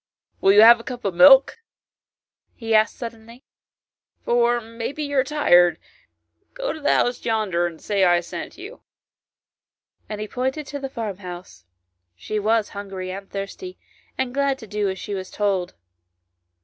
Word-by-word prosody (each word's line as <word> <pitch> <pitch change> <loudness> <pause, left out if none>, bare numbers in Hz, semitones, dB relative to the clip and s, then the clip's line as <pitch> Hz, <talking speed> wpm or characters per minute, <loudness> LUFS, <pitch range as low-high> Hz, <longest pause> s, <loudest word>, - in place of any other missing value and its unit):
" - - -46
Will 195 - +5
you 205 +1 +7
have 235 +1 +8
a - - -11
cup 245 -2 -8
of 195 - -1
milk? 270 - +6 0.5
" - - -72 0.2
he 225 -2 -3
asked 215 0 +3
suddenly, 230 +1 -10 0.4
" - - -59
for 240 0 +2
maybe 230 +6 -6
you 285 -1 -4
are - - +3
tired; 180 - +3 0.8
go - - -3
to 315 - -9
the 290 - +2
house 245 0 +1
yonder, 205 -7 0
and 165 -2 -10
say 200 -2 0
I 175 -1 +4
sent 315 - -8
you; 405 +7 -11 0.6
" - - -49
and 210 -1 -5
he 215 - -4
pointed 265 +6 -3
to 285 +1 -6
the 270 -1 -5
farm 220 -7 -5
house. 180 - -10 0.5
She 210 - -4
was 220 +1 +1
hungry 195 -2 -7
and 195 +1 -8
thirsty, 200 - -7 0.4
and 260 -2 -2
glad 280 0 0
to 230 - -11
do 210 -1 -1
as 190 - -4
she 205 - -6
was 185 -1 -5
told. 195 -4 -2
220 Hz, 175 wpm, -22 LUFS, 195-260 Hz, 0.8 s, have